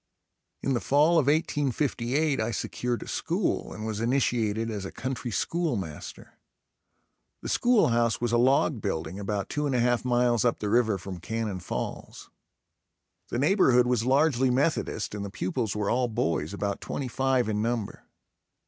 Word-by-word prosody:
In 135 - +1
the 120 - +1
fall 155 +6 +4
of 140 - 0
1858 145 -1 +1
I 110 - -1
secured 120 +1 -3
a - - -13
school - - -1
and 110 - -6
was 110 -1 -3
initiated 115 -3 0
as 105 -3 -4
a 95 - -6
country 130 -1 -4
school 165 +5 -1
master. 80 -7 -8 1.0
The - - -4
school 240 - +3
house 115 -1 +1
was 120 -1 -1
a 120 - +3
log 130 0 +3
building, 80 +3 -3
about 100 0 -2
two 150 0 -2
and 135 - 0
a - - +2
half 120 0 +2
miles 120 -2 +2
up 120 -2 +2
the 105 -1 -3
river 110 -3 +3
from 95 0 -7
Cannon 110 0 -3
Falls. 90 - -6 1.0
The - - -2
neighborhood 135 - +4
was 125 -2 +1
largely 135 0 +3
Methodist 140 0 0
and 105 -1 -4
the 100 - -5
pupils 105 +3 -2
were 105 -1 0
all 125 +1 +2
boys, 85 -9 -1
about 100 0 -3
twenty 135 - -4
five 130 -1 +1
in 105 -1 -1
number. 115 -2 -3
120 Hz, 165 wpm, -27 LUFS, 105-135 Hz, 1.0 s, fall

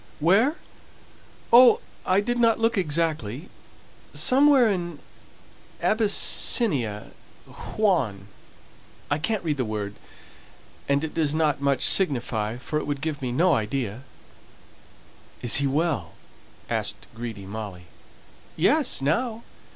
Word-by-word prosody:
"Where? 200 - +3 1.0
Oh, 245 +1 +8 0.3
I 185 +2 +3
didn't 235 0 +2
look 225 +1 +1
exactly 155 - -2 0.7
somewhere 270 -1 +5
in 175 -6 -2 0.8
Abyssinia 200 - +2 0.3
Huon. 130 - -2 0.8
I 145 - +1
can't 215 +5 -2
read 155 -3 -1
the 130 - 0
word, 105 -2 -4 1.0
and 140 +1 +1
it 160 - -4
doesn't 155 -2 0
much 140 -2 +1
signify, 120 - 0
for 150 +4 -3
it - - -6
would 145 -2 -3
give 155 -2 -3
me 125 -2 -3
no 170 +7 +3
idea." 110 0 -2 1.4
"Is 120 - +4
he 140 0 +1
well?" 140 - -1 0.5
asked - - -3
greedy 115 -4 -7
Molly. 100 -3 -7 0.7
"Yes, - - +2
now. 225 - -1
150 Hz, 105 wpm, -24 LUFS, 120-195 Hz, 1.4 s, Oh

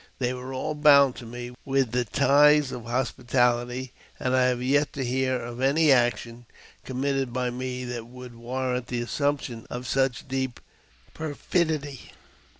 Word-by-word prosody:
They 125 -1 -1
were 130 +1 -7
all 135 +4 -3
bound 140 -3 +6
to 120 - -9
me 120 +1 -7
with 135 -3 +1
the 125 0 0
ties 145 +3 +4
of 120 -2 -7
hospitality, 125 0 0 0.3
and 130 0 0
I 130 -1 +4
have 125 -1 0
yet 145 +2 +2
to 135 -2 -3
hear 130 +1 0
of 120 +1 -7
any 145 +3 +4
action 120 -2 +1 0.4
committed 135 0 -1
by 125 0 -1
me 125 0 -4
that 120 -2 -5
would 125 0 -11
warrant 125 +1 -3
the 120 -1 -2
assumption 140 -3 -2
of 125 +1 -6
such 130 +1 0
deep 130 -2 -3 0.5
perfidy. 155 -2 -2
130 Hz, 155 wpm, -26 LUFS, 120-135 Hz, 0.5 s, bound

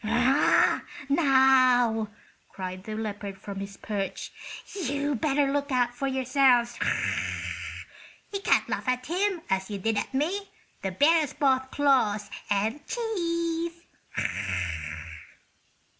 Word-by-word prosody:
"Now," 255 -6 +4 0.4
cried 185 0 -6
the 215 - -4
leopard 205 -2 -4
from 195 0 -7
his 195 0 -7
perch, 200 -2 -4 0.4
"you'd 285 - -1
better 285 -2 +2
look 285 0 -1
out 245 -1 +2
for 275 +3 -2
yourselves! 260 -2 +3 1.5
You 400 - -1
can't - - +3
laugh - - -3
at 255 0 0
him 365 +2 0
as 190 +1 -1
you 205 - -3
did 220 +2 0
at - - -4
me. 345 +9 -1 0.3
The 190 - -1
bear 295 - +4
has 300 -4 -2
both 265 -2 +2
claws 255 -9 +2 0.2
and 215 +8 0
teeth." 335 -6 -2
265 Hz, 115 wpm, -27 LUFS, 215-300 Hz, 1.5 s, Now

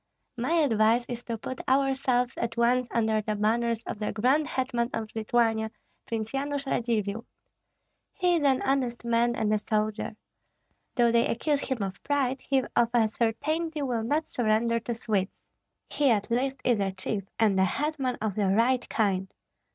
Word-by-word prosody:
My 250 +6 -1
advice 240 -6 +3
is 240 -1 -5
to 230 -1 -3
put 255 +4 -6
ourselves 265 -2 +2
at 235 0 -3
once 245 +1 +3
under 220 -2 +1
the 215 0 -2
banners 230 +2 0
of 210 - -6
the 210 - -2
grand 265 +7 +2
hetman 245 -3 -1
of 220 -1 -4
Lithuania, 225 0 +1 0.4
Prince 225 -1 -3
Yanush 280 +1 -2
Radzivill. 225 -4 -1 0.9
He 360 -2 +1
is - - -1
an 270 -2 +2
honest 255 -3 0
man 235 0 +2
and 215 -3 +1
a 215 - +2
soldier. 215 0 -2 0.8
Though 235 -2 +4
they 235 0 +3
accuse 280 +4 0
him 255 -6 -2
of 195 0 -5
pride, 270 -2 0
he 270 -2 +1
of 235 - +4
a 225 -2 +4
certainty 300 +8 -1
will 245 -4 -1
not 295 +8 0
surrender 230 0 +1
to 235 +1 -4
Swedes. 205 -4 0 0.6
He 290 -2 +1
at 220 0 +1
least 265 +2 0
is 240 -4 +2
a 195 -1 0
chief 195 +1 -4
and 210 -4 +3
a - - +5
hetman 275 +2 -1
of 215 -2 0
the 205 0 0
right 235 +6 +2
kind. 190 -3 0
235 Hz, 170 wpm, -27 LUFS, 220-265 Hz, 0.9 s, a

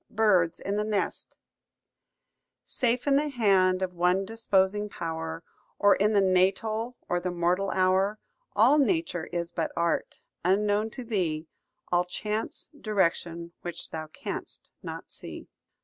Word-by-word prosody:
BIRDS 190 -6 +3
IN 200 +1 -2
THE 210 - +1
NEST 210 -1 -2 1.3
"Safe 245 0 0
in 280 -1 +4
the 295 +1 +1
hand 190 -7 +3
of 180 -1 -2
one 180 +2 +2
disposing 205 -1 +1
pow'r, 165 -2 -4 0.3
Or 205 -1 +5
in 210 +2 +2
the 200 - +5
natal, 200 +6 +1
or 175 - +1
the 180 - -2
mortal 175 +3 +1
hour, 190 +3 +2 0.4
All 245 +8 +6
Nature 290 - +1
is 170 -1 -3
but 165 -2 -2
art, 170 0 -1 0.2
unknown 205 +4 +2
to 255 - -4
thee; 175 -9 -1 0.5
All 175 0 +4
chance, 210 - -3
direction, 170 -7 -1
which 175 -1 -6
thou 155 -1 -5
canst 155 - -6
not - - -7
see." - - -8
190 Hz, 135 wpm, -28 LUFS, 175-215 Hz, 1.3 s, All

